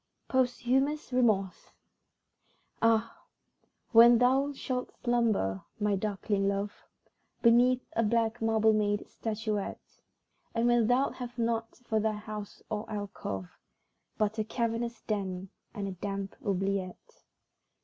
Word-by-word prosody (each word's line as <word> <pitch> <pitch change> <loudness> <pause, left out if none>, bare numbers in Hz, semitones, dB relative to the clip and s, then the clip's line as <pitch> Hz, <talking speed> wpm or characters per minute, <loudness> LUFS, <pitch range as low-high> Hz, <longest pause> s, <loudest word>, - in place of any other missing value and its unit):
Posthumous 260 +3 +1
Remorse 215 -7 +1 1.1
Ah, 225 0 +2 0.7
when 235 0 +8
thou 265 +4 +3
shalt 255 -2 -3
slumber, 225 - +1 0.2
my 205 -1 +2
darkling 200 0 -1
love, 200 +1 -1 0.7
Beneath 245 +2 +5
a 230 - +3
black 230 +1 +1
marble 220 -1 +3
made 205 -1 0
statuette, 215 -2 -4 0.5
And 230 +1 +2
when 240 -2 +4
thou'lt 255 +3 +2
have 245 -1 -7
nought 230 -1 -1
for 220 -1 +1
thy 215 0 +1
house 210 -1 -7
or 215 -1 -4
alcove, 195 - -5 0.7
But 215 +1 0
a - - +2
cavernous 230 +1 -2
den 190 -3 -3 0.2
and 205 -3 -4
a - - -3
damp 195 +1 -5
oubliette. 195 -1 -3
220 Hz, 115 wpm, -30 LUFS, 205-240 Hz, 1.1 s, when